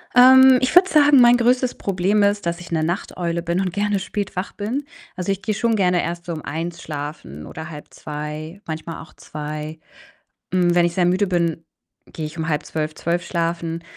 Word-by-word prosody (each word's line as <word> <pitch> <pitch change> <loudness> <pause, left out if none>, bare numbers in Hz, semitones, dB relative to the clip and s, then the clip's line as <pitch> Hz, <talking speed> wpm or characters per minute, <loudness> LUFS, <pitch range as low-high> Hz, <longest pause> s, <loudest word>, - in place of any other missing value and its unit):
Ähm, 260 +1 +8
ich 255 -1 0
würde 370 +2 +7
sagen, 290 -2 +6
mein 240 0 +7
größtes 250 +1 +2
Problem 195 +2 +1
ist, 205 -1 +1
dass 170 0 -2
ich 175 - -11
'ne 160 -1 0
Nachteule 170 0 -2
bin 170 +1 -1
und 185 -2 -1
gerne 205 0 0
spät 205 +1 -4
wach 185 +2 -3
bin. 240 +8 -3 0.3
Also, 180 +1 -2
ich 195 0 -3
gehe 215 0 -2
schon 230 +1 +1
gerne 180 -3 +2
erst 170 0 -5
so 170 - -4
um 155 - -6
1:00 165 +3 -5
schlafen 145 - -7
oder 160 +1 -8
1:30, 150 +3 -7
manchmal 160 +1 -6
auch 160 - -18
2:00. 150 +1 -7 0.7
Hm, 175 -2 +3
wenn 175 -1 +4
ich 170 - -3
sehr 180 -2 +2
müde 185 +3 +2
bin, 170 -3 -1 0.5
gehe 155 -2 -4
ich 155 - -10
um 160 0 -2
23:30, 155 0 -2
0:00 170 +1 -2
schlafen. 170 -1 -2
175 Hz, 195 wpm, -21 LUFS, 160-205 Hz, 0.7 s, Ähm